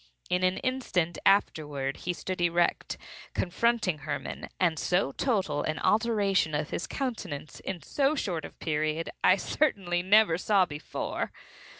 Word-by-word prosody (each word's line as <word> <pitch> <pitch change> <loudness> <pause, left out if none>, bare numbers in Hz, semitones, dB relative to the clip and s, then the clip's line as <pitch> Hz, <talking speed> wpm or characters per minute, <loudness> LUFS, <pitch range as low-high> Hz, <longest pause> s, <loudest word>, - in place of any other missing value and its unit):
In 180 - +2
an 185 0 +2
instant 240 -10 -1
afterward 145 -8 +1
he 180 - -2
stood 185 +1 -4
erect, 175 0 +1 0.4
confronting 190 -2 +1
Hermann; 145 0 -5
and 165 -4 +2
so 180 -6 +1
total 195 - 0
an 155 +1 -2
alteration 205 -7 +2
of 150 +1 -2 0.2
countenance 205 - -4
in 185 -3 -5
so 285 +1 +1
short 175 - -2
a - - -6
period 155 +1 -2
I 185 - +7
certainly 190 -6 0
never 190 -2 +5
saw 195 -1 +4
before. 150 -2 -4
180 Hz, 130 wpm, -29 LUFS, 155-205 Hz, 0.4 s, I